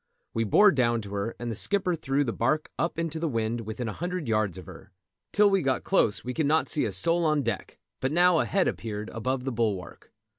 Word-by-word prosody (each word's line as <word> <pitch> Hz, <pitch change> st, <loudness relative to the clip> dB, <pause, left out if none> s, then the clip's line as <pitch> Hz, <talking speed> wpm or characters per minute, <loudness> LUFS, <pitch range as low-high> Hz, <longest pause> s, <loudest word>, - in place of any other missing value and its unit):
We 115 Hz, 0 st, 0 dB
bore 205 Hz, -, +6 dB
down 120 Hz, -6 st, +1 dB
to 100 Hz, -2 st, -9 dB
her, 100 Hz, +3 st, -3 dB
and 120 Hz, 0 st, -4 dB
the -, -, -4 dB
skipper 190 Hz, -, +1 dB
threw 145 Hz, -3 st, 0 dB
the 115 Hz, -5 st, -2 dB
barque 150 Hz, +6 st, 0 dB
up 170 Hz, 0 st, -1 dB
into 165 Hz, -1 st, -2 dB
the 165 Hz, -, -1 dB
wind 115 Hz, -1 st, -1 dB
within 115 Hz, +2 st, -4 dB
a 105 Hz, -, -3 dB
hundred 175 Hz, -3 st, -4 dB
yards 110 Hz, -5 st, 0 dB
of 90 Hz, -, -9 dB
her. -, -, -13 dB, 0.4 s
Till 210 Hz, 0 st, +5 dB
we 195 Hz, -1 st, +3 dB
got 135 Hz, -2 st, 0 dB
close 115 Hz, -, +2 dB
we 125 Hz, -, -4 dB
could 155 Hz, +2 st, 0 dB
not 160 Hz, +2 st, +2 dB
see 150 Hz, -, +1 dB
a -, -, -2 dB
soul 170 Hz, 0 st, +1 dB
on 155 Hz, -3 st, +2 dB
deck, -, -, -4 dB, 0.2 s
but 130 Hz, -, -1 dB
now 175 Hz, +1 st, +4 dB
a -, -, +1 dB
head 195 Hz, -2 st, +1 dB
appeared 110 Hz, -1 st, -4 dB
above 125 Hz, +3 st, -2 dB
the 135 Hz, -, -2 dB
bulwark. 110 Hz, -6 st, -3 dB
130 Hz, 235 wpm, -27 LUFS, 115-165 Hz, 0.4 s, bore